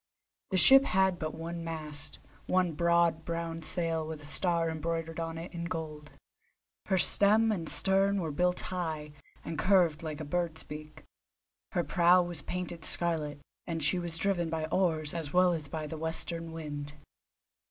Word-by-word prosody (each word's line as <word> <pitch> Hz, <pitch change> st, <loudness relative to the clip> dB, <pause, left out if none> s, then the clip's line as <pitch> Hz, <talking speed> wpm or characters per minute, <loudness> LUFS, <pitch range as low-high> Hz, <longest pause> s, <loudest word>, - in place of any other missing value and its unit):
The 190 Hz, -, 0 dB
ship 270 Hz, +8 st, +9 dB
had 190 Hz, -5 st, +1 dB
but 155 Hz, -1 st, -4 dB
one 165 Hz, +1 st, -6 dB
mast, 155 Hz, -2 st, -4 dB, 0.3 s
one 185 Hz, -2 st, +1 dB
broad 170 Hz, 0 st, +2 dB
brown 165 Hz, 0 st, -4 dB
sail 165 Hz, -1 st, 0 dB
with 160 Hz, -1 st, -6 dB
a 145 Hz, -, -8 dB
star 170 Hz, +2 st, +3 dB
embroidered 165 Hz, +1 st, -4 dB
on 165 Hz, 0 st, -4 dB
it 165 Hz, +3 st, -8 dB
in 170 Hz, -1 st, -5 dB
gold; 155 Hz, -3 st, -6 dB, 0.8 s
her 190 Hz, -, +1 dB
stem 210 Hz, +7 st, +5 dB
and 170 Hz, -6 st, -3 dB
stern 195 Hz, +1 st, +1 dB
were 165 Hz, -4 st, -3 dB
built 180 Hz, +4 st, 0 dB
high, 160 Hz, -5 st, -4 dB, 0.3 s
and 160 Hz, -2 st, -5 dB
curved 180 Hz, -5 st, +2 dB
like 155 Hz, -2 st, -6 dB
a 155 Hz, -, -6 dB
bird's 165 Hz, +1 st, -2 dB
beak; 155 Hz, +1 st, -10 dB, 0.7 s
her 175 Hz, -3 st, 0 dB
prow 175 Hz, +1 st, +4 dB
was 175 Hz, -3 st, -5 dB
painted 175 Hz, 0 st, -6 dB
scarlet, 155 Hz, -4 st, +1 dB, 0.3 s
and 165 Hz, -3 st, -3 dB
she 180 Hz, +5 st, +2 dB
was 170 Hz, -2 st, -1 dB
driven 175 Hz, -2 st, 0 dB
by 160 Hz, -1 st, -2 dB
oars 160 Hz, -5 st, 0 dB
as 160 Hz, -4 st, -5 dB
well 180 Hz, 0 st, +4 dB
as 155 Hz, -3 st, -4 dB
by 155 Hz, +1 st, -5 dB
the 155 Hz, +1 st, -7 dB
western 165 Hz, +1 st, -1 dB
wind. 150 Hz, -2 st, -7 dB
165 Hz, 165 wpm, -30 LUFS, 155-175 Hz, 0.8 s, ship